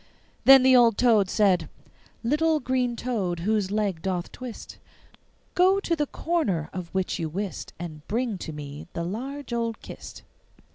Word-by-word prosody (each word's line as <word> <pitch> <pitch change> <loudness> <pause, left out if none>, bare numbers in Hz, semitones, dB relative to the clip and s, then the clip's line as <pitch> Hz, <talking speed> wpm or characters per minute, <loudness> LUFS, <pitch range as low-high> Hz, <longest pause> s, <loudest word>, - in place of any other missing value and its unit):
Then 270 -1 +9
the 260 0 +6
old 235 -3 +5
toad 220 -6 +4
said: 195 -4 +2 0.5
'Little 305 +5 +2
green 250 -2 0
toad 200 -9 -2
whose 210 0 +1
leg 200 -5 -1
doth 180 -1 -2
twist, 250 -3 -9 0.7
Go 375 +2 +4
to 345 -4 0
the 295 -2 -1
corner 220 - -1
of 185 -2 -5
which 190 -1 -1
you 160 -2 -2
wist, 195 +4 -5
And 155 -3 -8
bring 225 -2 -1
to 160 - -6
me 145 0 -8
the 170 - -3
large 255 +9 -5
old 230 -1 -2
kist. - - -10
215 Hz, 155 wpm, -26 LUFS, 180-255 Hz, 0.7 s, Then